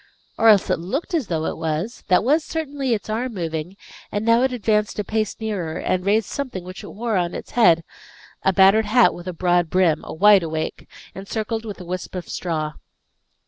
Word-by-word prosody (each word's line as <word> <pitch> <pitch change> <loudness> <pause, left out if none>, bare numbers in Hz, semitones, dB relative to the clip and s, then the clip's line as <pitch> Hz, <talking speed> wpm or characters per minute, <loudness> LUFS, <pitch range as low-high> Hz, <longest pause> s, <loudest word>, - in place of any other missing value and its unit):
Or 225 - +3
else 210 -3 +6
it 180 - +1
looked 260 - -4
as 305 - 0
though 160 -2 -2
it - - -3
was. 165 +8 -3
That 180 +1 +4
was 300 +6 +3
certainly 285 -7 -2
its 210 - -7
arm 230 +2 -3
moving, 165 +1 -4 0.3
and 205 +1 -2
now 230 +1 +4
it 260 0 +2
advanced 210 -3 0
a 210 - -1
pace 215 +1 -2
nearer, 200 -8 -3
and 185 0 -1
raised 210 +2 +2
something 255 -10 -5
which 185 +1 -9
it - - -8
wore 225 0 -2
on 175 -1 -1
its - - -8
head 170 -9 +4 0.6
a 190 - +3
battered 195 +3 +5
hat 225 -4 +5
with 175 +1 -10
a - - -2
broad 175 0 +1
brim, 175 -4 +2
a - - -8
"wide 200 +3 +6
awake," 160 -1 -4 0.2
encircled 220 +3 -4
with 210 -3 -7
a 180 - -9
wisp 180 +1 -5
of 180 - -5
straw. 155 -3 -3
200 Hz, 205 wpm, -22 LUFS, 175-225 Hz, 0.6 s, else